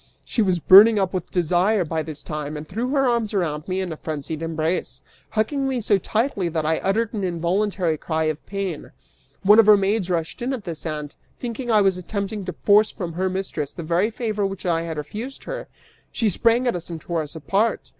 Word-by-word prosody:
She 230 - 0
was 185 -4 +2
burning 205 +6 +8
up 190 -2 0
with 185 -2 -3
desire 180 +3 +2
by 160 0 -2
this 155 -1 -7
time, 150 -1 -5
and 150 +1 -8
threw 230 +8 -3
her 270 -1 +2
arms 230 -3 0
around 155 -5 -1
me 190 0 -1
in 185 -2 -3
a - - -9
frenzied 155 0 -5
embrace, 165 +1 -2 0.3
hugging 270 +5 0
me 260 -2 -1
so 205 -3 +2
tightly 215 -4 -1
that 160 -2 -2
I 160 +1 +1
uttered 215 +4 0
an 210 -3 -3
involuntary 175 -1 0
cry 160 -1 -1
of 155 -1 -2
pain. 195 -6 -4 0.5
One 210 +3 +7
of 220 - +6
her 210 -1 +8
maids 195 -1 0
rushed 170 +6 -2
in 255 +3 -1
at 245 -6 -5
this 165 -2 -6
and, 150 -1 -4 0.3
thinking 245 +1 -5
that 230 - +2
I 210 - +6
was 195 -2 +2
attempting 200 +2 -4
to 180 - -4
force 210 +1 +5
from 175 -3 -6
her 185 +3 0
mistress 185 -6 -3
the 170 - -7
very 175 +6 +1
favor 215 -3 -2
which 195 -1 -3
I 165 -2 +1
had 165 -2 -5
refused 215 - -6
her, - - -6 0.4
she 225 -3 +1
sprang 235 +6 +2
at 240 - +1
us 175 0 -5
and 165 -1 -5
tore 170 0 -2
us 150 +1 -6
apart. 200 +8 0
190 Hz, 220 wpm, -23 LUFS, 165-215 Hz, 0.5 s, burning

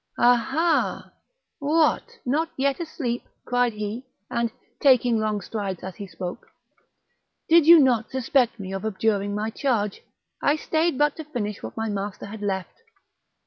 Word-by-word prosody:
"Ah, 245 +1 +6
ha! 315 +8 0 0.5
what, 320 +10 +1
not 305 +6 +1
yet 275 +2 +1
asleep!" 275 -8 -3 0.2
cried 245 -1 +1
he; 215 +4 -5 0.2
and, 235 -1 0 0.3
taking 250 -4 +4
long 215 -1 -1
strides 195 -3 -4
as 185 -1 -7
he 200 - -7
spoke. 180 -1 -7 1.0
"Did 325 -1 +5
you 335 0 +10
not 245 -5 +3
suspect 255 -2 +1
me 190 -1 -6
of 195 - -4
abjuring 205 -1 0
my 215 +1 -2
charge? 220 -7 -1 0.4
I 285 - +3
stayed 315 -1 0
but 295 0 +2
to 320 - -5
finish 215 -9 -4
what - - -8
my 225 0 -1
master 205 -1 -4
had 210 +1 -8
left." 190 - -3
235 Hz, 150 wpm, -24 LUFS, 205-285 Hz, 1.0 s, you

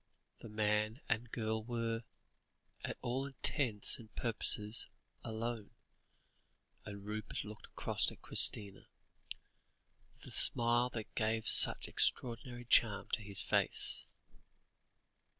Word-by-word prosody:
The 115 - -10
man 105 +2 -1
and 115 +1 -2
girl 110 -1 -3
were, 115 -1 -3 0.8
to - - -5
all 130 +3 -2
intents 130 -5 0
and 110 -3 -14
purposes, 110 -1 +3 0.4
alone, 115 -1 -5 1.1
and 100 -1 -9
Rupert 105 0 -5
looked 105 0 -10
across - - +1
at - - -16
Christina, 100 -2 +3 1.3
with - - -23
the - - -9
smile 120 +1 +4
that 110 -2 -7
gave 110 0 -1
such - - +4
extraordinary 120 0 -1
charm 110 -3 +3
to 115 - 0
his 100 -2 -3
face. - - +1
110 Hz, 110 wpm, -35 LUFS, 105-120 Hz, 1.3 s, smile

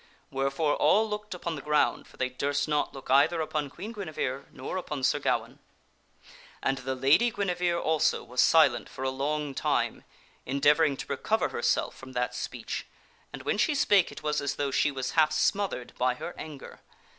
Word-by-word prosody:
Wherefore 135 +3 0
all 220 +2 +4
looked 210 -2 -5
upon 170 -1 -4
the 145 - -6
ground, 150 +1 +1
for - - -19
they 130 - 0
durst 140 +4 -1
not 150 -1 0
look 135 -1 -7
either 140 +5 +4
upon 155 -2 -2
Queen 195 +10 -7
Guinevere 155 - -4
nor 130 +6 -6
upon 150 -7 -4
Sir - - +3
Gawaine. - - -1 1.0
And 135 0 0
the 130 0 -3
Lady 140 - +4
Guinevere, 180 -5 0
also, 160 -2 +1
was 125 +1 0
silent 135 -8 +4
for 130 - -7
a 130 - 0
long 145 +2 -2
time, - - 0 0.4
endeavoring 145 +2 +3
to - - -5
recover - - 0
herself - - 0
from 130 0 -11
that 125 0 -1
speech, - - -5 0.4
and - - -8
when - - -1
she 305 - +2
spake, 205 -9 +4
it - - -10
was 150 -1 0
as 145 - -2
though 140 -1 -1
she 145 - +2
was 130 -2 -3
half 155 -1 +4
smothered 155 -4 0
by 125 0 +2
her 170 - -6
anger. 150 -3 -9
145 Hz, 180 wpm, -28 LUFS, 135-170 Hz, 1.0 s, all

